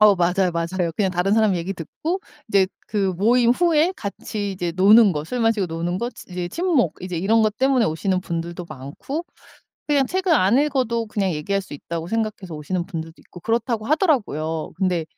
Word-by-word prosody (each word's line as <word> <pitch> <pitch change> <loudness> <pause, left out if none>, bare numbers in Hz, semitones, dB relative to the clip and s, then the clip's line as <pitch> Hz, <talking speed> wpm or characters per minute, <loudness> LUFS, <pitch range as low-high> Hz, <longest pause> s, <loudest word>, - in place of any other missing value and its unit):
어 210 -1 +7
맞아요, 180 0 +1
맞아요. 170 0 -1
그냥 195 -3 +1
다른 180 +2 0
사람 215 -4 +3
얘기 175 +3 -3
듣고 320 - -4 0.3
이제 195 -2 +4 0.2
그 195 -3 0
모임 235 +4 +4
후에 335 +4 +3
같이 200 0 -4
이제 175 -2 -3
노는 205 +1 +7
거 150 0 -3
술 245 +8 -3
마시고 225 -4 +2
노는 170 +2 -3
거 240 +1 -2
치 - - -13
이제 180 -1 -3
친목 290 - +1
이제 180 -2 -4
이런 220 +5 +3
것 215 0 +1
때문에 260 -3 +3
오시는 185 +4 0
분들도 170 0 -4
많고 155 - -6 0.6
그냥 280 -3 +3
책을 375 +1 0
안 215 +2 +4
읽어도 255 -6 0
그냥 200 -3 -1
얘기할 195 +6 -1
수 150 - -10
있다고 165 +3 -5
생각해서 215 -6 -3
오시는 170 +4 -3
분들도 165 -3 -6
있고 175 - -14
그렇다고 230 +1 -1
하더라고요. 205 - 0
근데 180 -4 0
195 Hz, 390 characters per minute, -22 LUFS, 175-235 Hz, 0.6 s, 어